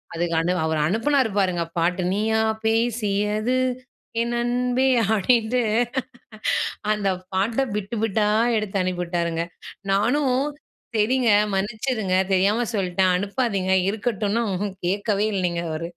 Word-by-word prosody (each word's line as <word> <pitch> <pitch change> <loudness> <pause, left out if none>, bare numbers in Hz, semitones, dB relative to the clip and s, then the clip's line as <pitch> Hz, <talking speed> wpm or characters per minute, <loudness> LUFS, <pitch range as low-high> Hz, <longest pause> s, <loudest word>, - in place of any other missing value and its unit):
அதுக்கண்டி 170 +1 0
அவரு 160 -1 0
அனுப்பினாரு 240 - +2
பாருங்க 180 -3 +1
பாட்டு, 180 +2 +1
"நீயா 220 +2 +1 0.2
பேசியது 220 0 +1 0.7
என் 235 0 -1
அன்பே" 250 +2 +1 0.2
அ - - +2
ப்படின்ட்டு. 230 +3 +2 1.3
அந்த 210 -2 0 0.3
பாட்ட 225 +7 +1
பிட் 210 +2 -3
பிட்டா 210 -1 +1 0.3
எடுத்து 210 -2 -2
அனுப்பிவிட்டாருங்க. 170 -2 -1 0.5
நானும் 250 +7 +2 0.6
செரிங்க, 235 +3 +2 0.3
மன்னிச்சிடுங்க 215 -1 -1 0.2
தெரியாம 205 +6 +2
சொல்லிட்டேன், 185 -1 +1
அனுப்பாதிங்க 200 -2 -1 0.2
இருக்கட்டும்னா, 215 +1 -1
ம்ஹும் 190 0 -3
கேட்கவே 205 +2 0
இல்லிங்க, 175 -2 -1
அவரு. 165 +2 -4
210 Hz, 105 wpm, -23 LUFS, 185-230 Hz, 1.3 s, அனுப்பினாரு